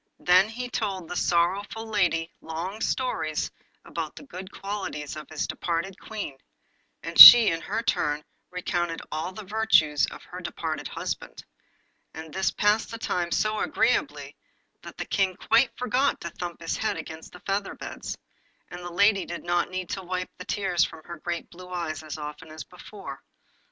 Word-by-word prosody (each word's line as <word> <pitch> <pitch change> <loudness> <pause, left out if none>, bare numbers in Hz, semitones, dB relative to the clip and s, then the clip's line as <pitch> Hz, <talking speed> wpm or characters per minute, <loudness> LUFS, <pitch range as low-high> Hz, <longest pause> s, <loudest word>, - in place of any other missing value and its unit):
Then 185 +3 +4
he 245 +3 -5
told 195 -7 -3
the 180 - -6
sorrowful 190 +7 0
lady 180 -6 0
long 175 +7 -5
stories 160 - -1 0.3
about - - -5
the - - -10
good 190 -8 -9
qualities 195 -8 -5
of 155 - -9
his 155 -1 -2
departed 175 +3 -3
Queen, 205 -11 -6 0.6
and - - -4
she 240 -2 +14
in 165 0 -2
her 220 +3 -3
turn 150 -9 0 0.2
recounted 175 -2 -2
all 160 +4 -3
the 215 +3 -9
virtues 190 -8 +3
of - - -10
her - - -9
departed - - -4
husband; - - -6 0.7
and 160 -1 -9
this 190 0 +1
passed 210 +2 +1
the 230 - -6
time 175 -6 -1
so 215 +3 +1
agreeably - - 0 0.5
that - - -11
the - - -4
King 195 -3 +1
quite 235 +6 +3
forgot 255 +2 +1
to 170 - -5
thump 175 0 -7
his 165 - -2
head 220 - -1
against 160 0 -8
the 180 - -12
feather 200 0 -2
beds, - - -7 0.5
and 175 - -8
the 175 0 -7
lady 200 +2 +4
did 170 - -7
not 175 0 0
need 185 -1 -5
to 195 - -3
wipe 185 0 -4
the 180 - -7
tears 180 -4 +1
from 160 - -5
her 170 +1 -8
great 170 +1 -4
blue 180 +1 -12
eyes 170 -4 -4
as 155 -1 -7
often 150 +1 -7
as 155 0 -7
before. 180 -5 -10
180 Hz, 170 wpm, -26 LUFS, 165-205 Hz, 0.7 s, she